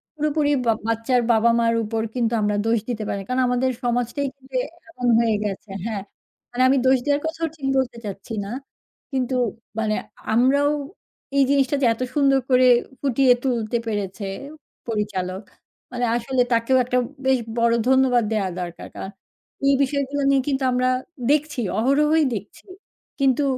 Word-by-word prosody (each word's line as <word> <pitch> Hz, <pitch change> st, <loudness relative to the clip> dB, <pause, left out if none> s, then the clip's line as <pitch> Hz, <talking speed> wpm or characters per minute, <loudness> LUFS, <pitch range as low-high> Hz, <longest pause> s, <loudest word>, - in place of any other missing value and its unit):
পুরোপুরি 300 Hz, -1 st, 0 dB, 0.2 s
বা 230 Hz, -, +4 dB, 0.2 s
বাচ্চার 230 Hz, +2 st, +1 dB
বাবা-মার 230 Hz, 0 st, +3 dB
উপর 220 Hz, +1 st, -2 dB
কিন্তু 235 Hz, -2 st, 0 dB
আমরা 210 Hz, 0 st, +1 dB
দোষ 225 Hz, 0 st, +2 dB
দিতে 225 Hz, -3 st, -2 dB
পারি 200 Hz, -, -2 dB
না। -, -, -10 dB
কারণ, 255 Hz, +1 st, +1 dB
আমাদের 250 Hz, +1 st, +1 dB
সমাজটাই 245 Hz, +4 st, 0 dB
কিন্তু 265 Hz, -1 st, -4 dB, 0.3 s
এমন 250 Hz, -7 st, -3 dB
হয়ে 225 Hz, -2 st, +2 dB
গেছে 205 Hz, 0 st, -5 dB, 0.2 s
হ্যাঁ। 215 Hz, -3 st, -3 dB, 0.5 s
মানে 245 Hz, +1 st, -2 dB
আমি 270 Hz, +1 st, +4 dB
দোষ 260 Hz, 0 st, +5 dB
দেওয়ার 290 Hz, 0 st, +1 dB
কথাও 325 Hz, 0 st, -2 dB
ঠিক 275 Hz, -4 st, -4 dB
বলতে 250 Hz, -3 st, -1 dB
চাচ্ছি 200 Hz, +3 st, -7 dB
না। -, -, -7 dB, 0.6 s
কিন্তু 260 Hz, -1 st, -1 dB, 0.4 s
মানে 215 Hz, -1 st, 0 dB, 0.4 s
আমরাও 280 Hz, +5 st, +3 dB, 0.7 s
এই 275 Hz, -, +6 dB
জিনিসটা 280 Hz, 0 st, +2 dB
যে 260 Hz, -, +3 dB
এত 225 Hz, -, -10 dB
সুন্দর 275 Hz, -2 st, +4 dB
করে 255 Hz, 0 st, +5 dB, 0.3 s
ফুটিয়ে 265 Hz, -2 st, +4 dB
তুলতে 235 Hz, -3 st, 0 dB
পেরেছে, 200 Hz, -1 st, -3 dB, 0.6 s
পরিচালক 200 Hz, -3 st, -3 dB, 0.5 s
মানে 245 Hz, 0 st, 0 dB
আসলে 250 Hz, +2 st, 0 dB
তাকেও 230 Hz, +3 st, +3 dB
একটা 250 Hz, 0 st, 0 dB, 0.3 s
বেশ 265 Hz, -1 st, +3 dB, 0.2 s
বড় 235 Hz, 0 st, +3 dB
ধন্যবাদ 260 Hz, -3 st, +4 dB
দেওয়া 205 Hz, -4 st, 0 dB
দরকার। 175 Hz, -1 st, -7 dB
কারণ, 190 Hz, -, -6 dB, 0.6 s
এই 275 Hz, -, +5 dB
বিষয়গুলা 280 Hz, +1 st, -1 dB
নিয়ে 275 Hz, -1 st, +4 dB
কিন্তু 270 Hz, -1 st, 0 dB
আমরা 250 Hz, 0 st, +2 dB, 0.4 s
দেখছি 295 Hz, -2 st, 0 dB, 0.2 s
অহরহই 300 Hz, +6 st, +3 dB
দেখছি 205 Hz, +1 st, -9 dB, 0.5 s
কিন্তু 270 Hz, +1 st, +3 dB
250 Hz, 155 wpm, -22 LUFS, 225-275 Hz, 0.7 s, এই